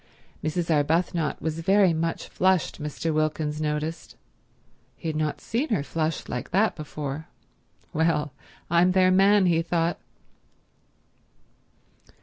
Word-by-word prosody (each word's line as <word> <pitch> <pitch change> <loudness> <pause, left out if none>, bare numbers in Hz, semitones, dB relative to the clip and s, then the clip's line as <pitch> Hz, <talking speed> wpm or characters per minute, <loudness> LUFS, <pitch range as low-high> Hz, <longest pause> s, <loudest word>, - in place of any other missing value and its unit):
Mrs. 165 +2 -1
Arbuthnot 160 +2 +1
was 160 0 -2
very 190 +1 +4
much 165 +1 -2
flushed, 185 -4 +1
Mr. 150 +2 -2
Wilkins 155 0 -1
noticed. 155 +2 -3 0.8
He 165 - -4
had 155 - -3
not 155 -1 -1
seen 255 +7 -2
her 200 -10 +1
flushed 160 +1 -2
like 125 - -4
that 205 +5 +2
before. 150 0 -6 0.7
"Well, 150 -3 +1 0.3
I'm 175 +2 +3
their 185 -1 +4
man," 195 +1 +5
he 165 -2 +3
thought. 170 0 0
165 Hz, 120 wpm, -25 LUFS, 155-180 Hz, 0.8 s, man